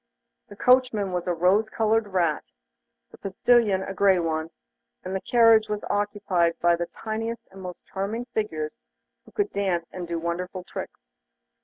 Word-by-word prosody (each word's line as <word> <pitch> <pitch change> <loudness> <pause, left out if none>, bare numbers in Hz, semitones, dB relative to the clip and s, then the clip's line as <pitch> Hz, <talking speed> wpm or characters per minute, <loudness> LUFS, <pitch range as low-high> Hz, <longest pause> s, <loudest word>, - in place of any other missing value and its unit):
The 205 - -12
coachman 250 -5 +3
was 180 0 -3
a 175 - +2
rose 190 +6 +3
coloured 220 0 +1
rat, 175 -6 0 0.7
the - - -15
postilion 200 0 +2
a 195 - -5
grey 195 -1 +4
one, 160 -2 -1 0.5
and 185 +1 -4
the 190 - -2
carriage 230 -2 +5
was 210 0 -3
occupied 200 -5 0
by 175 0 +4
the 170 0 -3
tiniest 225 +1 -5
and 190 0 -11
most 180 -1 -8
charming 210 +5 -3
figures, 210 -6 -3 0.5
who - - -17
could 410 -1 -1
dance 185 -4 0
and 180 -2 -5
do 170 0 -2
wonderful 180 +2 -4
tricks. - - -8
195 Hz, 160 wpm, -25 LUFS, 175-220 Hz, 0.7 s, carriage